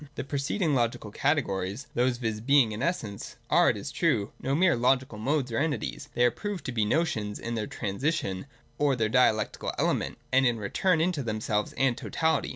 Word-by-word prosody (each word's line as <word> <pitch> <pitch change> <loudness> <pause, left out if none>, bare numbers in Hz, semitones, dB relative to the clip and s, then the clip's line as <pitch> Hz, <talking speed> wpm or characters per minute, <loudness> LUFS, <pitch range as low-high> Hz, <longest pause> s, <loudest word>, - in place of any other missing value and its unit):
The - - -3
preceding 145 +5 -1
logical 115 -4 0
categories, 110 -5 -1
those 125 0 +1
viz. 110 -3 -3
iif - - -14
Being 135 -6 +5
and 105 - -5
Essence, 125 - -3 0.2
are, - - +6
it - - 0
is - - -6
true, 100 +1 +1
no 135 +1 0
mere 175 0 +4
logical 125 -2 +1
modes 130 +2 0
or 115 - 0
entities: 140 -6 -2
tiiey 120 - +4
are 120 - +4
proved 190 - -5
to - - -2
be 110 -3 +1
notions 110 -6 0
in 115 - -5
their 110 -2 -2
trans 100 0 -5
ition 140 - -1 0.3
or 145 -2 +3
their 110 -3 0
dialectical 110 -3 +2
element, - - 0 0.2
and 130 +1 +5
in 120 - +2
their 110 - -7
return 165 - +1
into 170 -3 0
themselves 110 -2 -1
and 130 -2 +2
totality. 160 -1 0
125 Hz, 200 wpm, -28 LUFS, 110-145 Hz, 0.3 s, are